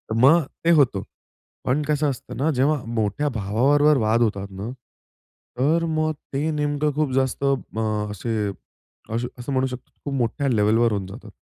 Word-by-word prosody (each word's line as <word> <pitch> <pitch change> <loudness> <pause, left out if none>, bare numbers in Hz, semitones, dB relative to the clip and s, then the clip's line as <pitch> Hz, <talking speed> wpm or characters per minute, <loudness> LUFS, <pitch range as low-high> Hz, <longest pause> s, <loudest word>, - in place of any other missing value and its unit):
मग, 140 +6 +5 0.2
ते - - +4
होतं. 130 - +4 0.6
पण 135 +4 +1
कसं 150 -1 +1
असतं 130 - -6
ना 145 +5 +1
जेव्हा 140 +2 +2
मोठ्या 115 +5 -1
भावाबरोबर 135 +7 +3
वाद 110 +1 +2
होतात 100 -3 0
ना, 100 +4 -6 0.9
तर 160 +6 +2
मग 155 -1 0 0.2
ते 150 +4 0
नेमकं 150 0 0
खूप 150 -3 0
जास्त 135 +1 0
मग 110 -6 -1
असे 105 +4 -5 0.8
असं 120 +3 -4
म्हणू 130 0 +2
शकतो 125 -1 -8
खूप 140 - -3
मोठ्या 135 +3 0
लेव्हलवर 115 +1 +3
होऊन 100 -2 -2
जातात. 105 +1 -11
130 Hz, 150 wpm, -23 LUFS, 110-145 Hz, 0.9 s, मग